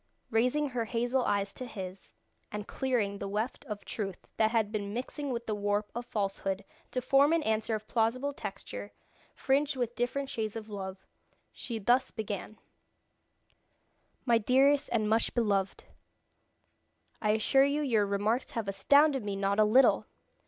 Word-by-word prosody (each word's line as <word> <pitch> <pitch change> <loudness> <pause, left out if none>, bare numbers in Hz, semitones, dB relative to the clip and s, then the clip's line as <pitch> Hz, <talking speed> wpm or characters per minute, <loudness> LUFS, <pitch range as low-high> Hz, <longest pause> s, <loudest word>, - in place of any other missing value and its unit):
Raising 250 +6 +2
her 245 -3 -2
hazel 245 +3 0
eyes 200 0 0
to 255 - -7
his, 190 -4 -8 0.4
and 210 0 -5
clearing 225 -7 -1
the 200 - -4
weft 215 +8 -3
of 210 -5 -6
truth 195 -4 -5
that 220 -1 +4
had 220 -2 +1
been 205 -1 -3
mixing 280 +4 -4
with 235 -2 -3
the 215 - -2
warp 205 0 -1
of 240 +1 -5
falsehood 195 -2 -2 0.2
to 255 - -3
form 275 +4 +5
an 330 -2 +2
answer 220 -1 0
of 215 0 -7
plausible 250 +5 0
texture, 100 - -7 0.4
fringed 280 +2 +1
with 240 -2 -2
different 250 +3 -1
shades 220 -4 -3
of 220 -1 -6
love, 190 -2 -6 0.5
she 235 -3 -6
thus 245 +5 +2
began: 215 -1 -5 1.7
"My 235 -3 +4
dearest 270 +5 +3
and 215 -3 +1
much 225 +1 +1
beloved, 200 -5 0 1.4
I 210 -1 +3
assure 270 +5 +4
you 290 +2 0
your 220 -7 +2
remarks 205 +5 0
have 225 -3 -4
astounded 280 +6 +4
me 205 -1 -3
not 195 +1 0
a - - +7
little! 245 +6 +4
225 Hz, 155 wpm, -30 LUFS, 205-255 Hz, 1.7 s, a